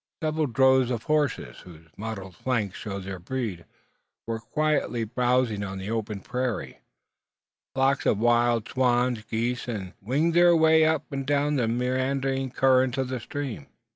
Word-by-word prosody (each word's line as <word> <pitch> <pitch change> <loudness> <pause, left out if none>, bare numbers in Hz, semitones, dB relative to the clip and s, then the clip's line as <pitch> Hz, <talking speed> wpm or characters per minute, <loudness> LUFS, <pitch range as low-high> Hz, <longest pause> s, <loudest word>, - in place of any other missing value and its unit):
Several 155 -1 0
droves 130 0 +4
of 120 -3 -2
horses, 150 -4 -1
whose 80 -3 -14
mottled 100 -4 -6
flanks 110 -4 -1
showed 100 -2 -5
their 95 -1 -6
breed, 100 -4 -4 0.6
were 115 -1 -3
quietly 145 -2 0
browsing 120 -2 +1
on 95 -1 -5
the 95 +3 -5
open 110 -3 -3
prairie. 125 0 -3 1.0
Flocks 135 +1 +2
of - - +3
wild 120 0 +2
swans, 125 -2 +1
geese, 120 +3 -2
and 105 -6 -4
gruyas 100 - -24
winged 155 +7 +2
their 175 0 +6
way 160 0 +5
up 155 -2 +1
and 135 -1 -4
down 145 +1 +1
the 125 -4 +1
meandering 130 +2 0
current 130 0 +3
of 130 -1 -1
the 130 -1 -3
stream. 130 - -5
125 Hz, 155 wpm, -26 LUFS, 110-135 Hz, 1.0 s, their